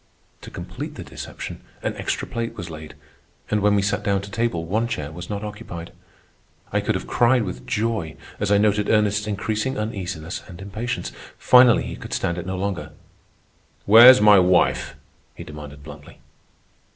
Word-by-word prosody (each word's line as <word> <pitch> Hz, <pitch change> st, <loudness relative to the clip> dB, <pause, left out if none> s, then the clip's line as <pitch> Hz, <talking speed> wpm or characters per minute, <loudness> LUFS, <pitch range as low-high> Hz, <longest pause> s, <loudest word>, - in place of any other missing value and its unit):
To -, -, -10 dB
complete -, -, -7 dB
the -, -, -7 dB
deception, -, -, -8 dB, 0.2 s
an -, -, -1 dB
extra -, -, -3 dB
plate 115 Hz, 0 st, -4 dB
was 90 Hz, -4 st, -7 dB
laid, 80 Hz, -1 st, -10 dB, 0.6 s
and 105 Hz, 0 st, +1 dB
when 105 Hz, 0 st, +3 dB
we 100 Hz, -, +2 dB
sat 105 Hz, +1 st, 0 dB
down 100 Hz, -1 st, 0 dB
to 100 Hz, -, -9 dB
table 105 Hz, -7 st, -1 dB
one 110 Hz, +7 st, 0 dB
chair 75 Hz, -10 st, -4 dB
was 90 Hz, +2 st, -9 dB
not 100 Hz, 0 st, -4 dB
occupied. 105 Hz, -5 st, -8 dB, 0.8 s
I -, -, +2 dB
could -, -, -1 dB
have -, -, -4 dB
cried 120 Hz, 0 st, +3 dB
with 90 Hz, -3 st, -7 dB
joy 110 Hz, -9 st, -2 dB, 0.2 s
as 105 Hz, -, -1 dB
I 100 Hz, -, +5 dB
noted 105 Hz, 0 st, +2 dB
Ernest's 105 Hz, 0 st, +2 dB
increasing 110 Hz, +5 st, -2 dB
uneasiness 95 Hz, -6 st, -4 dB
and 90 Hz, -2 st, -11 dB
impatience. 105 Hz, +5 st, -4 dB, 0.3 s
Finally 125 Hz, -2 st, +6 dB
he -, -, -6 dB
could -, -, -8 dB
stand 85 Hz, +1 st, -1 dB
it 90 Hz, -, -7 dB
no 95 Hz, 0 st, -3 dB
longer. 90 Hz, -6 st, -4 dB, 0.9 s
"Where's 120 Hz, +5 st, +9 dB
my 105 Hz, -1 st, +7 dB
wife?" 90 Hz, -1 st, +2 dB, 0.4 s
he -, -, -8 dB
demanded 75 Hz, -1 st, -10 dB
bluntly. 75 Hz, -1 st, -12 dB
100 Hz, 170 wpm, -22 LUFS, 85-110 Hz, 0.9 s, Where's